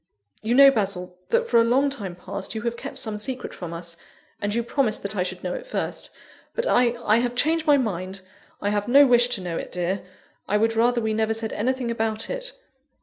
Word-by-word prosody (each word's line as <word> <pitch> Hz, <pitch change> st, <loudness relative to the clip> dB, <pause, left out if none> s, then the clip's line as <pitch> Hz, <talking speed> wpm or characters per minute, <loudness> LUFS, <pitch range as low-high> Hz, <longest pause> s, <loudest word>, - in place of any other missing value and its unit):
"You 230 Hz, +3 st, 0 dB
know, 275 Hz, +1 st, +9 dB
Basil, 190 Hz, -6 st, -2 dB
that 470 Hz, 0 st, +2 dB
for 235 Hz, -, +5 dB
a -, -, +5 dB
long 265 Hz, +4 st, +3 dB
time 200 Hz, -10 st, -5 dB
past, 195 Hz, +4 st, -6 dB
you 220 Hz, -, -4 dB
have 235 Hz, 0 st, -1 dB
kept -, -, -7 dB
some 215 Hz, -2 st, -3 dB
secret 255 Hz, +4 st, -5 dB
from 175 Hz, -2 st, -7 dB
us; 170 Hz, 0 st, -7 dB, 0.5 s
and 205 Hz, -, -1 dB
you 235 Hz, +2 st, 0 dB
promised 235 Hz, -2 st, 0 dB
that 200 Hz, +1 st, -4 dB
I 185 Hz, -, 0 dB
should 180 Hz, -, -4 dB
know -, -, -2 dB
it -, -, -6 dB
first; -, -, -3 dB, 0.5 s
but 475 Hz, -, -1 dB
I 245 Hz, -, +3 dB
I 215 Hz, +1 st, +4 dB
have 240 Hz, 0 st, 0 dB
changed 315 Hz, +5 st, +1 dB
my 290 Hz, -1 st, +6 dB
mind; 190 Hz, -5 st, -3 dB, 0.4 s
I 205 Hz, -, +1 dB
have 205 Hz, -1 st, -1 dB
no 280 Hz, +4 st, +7 dB
wish 240 Hz, -2 st, +5 dB
to 240 Hz, -5 st, -2 dB
know 175 Hz, -2 st, -3 dB
it, -, -, -6 dB
dear: 180 Hz, +2 st, -2 dB, 0.4 s
I 210 Hz, -, +2 dB
would 225 Hz, +1 st, +1 dB
rather 235 Hz, +1 st, +3 dB
we 220 Hz, -1 st, 0 dB
never 220 Hz, 0 st, +1 dB
said 225 Hz, -1 st, -4 dB
anything 250 Hz, +2 st, -1 dB
about 225 Hz, -1 st, -1 dB
it." -, -, -3 dB
225 Hz, 225 wpm, -24 LUFS, 200-250 Hz, 0.5 s, know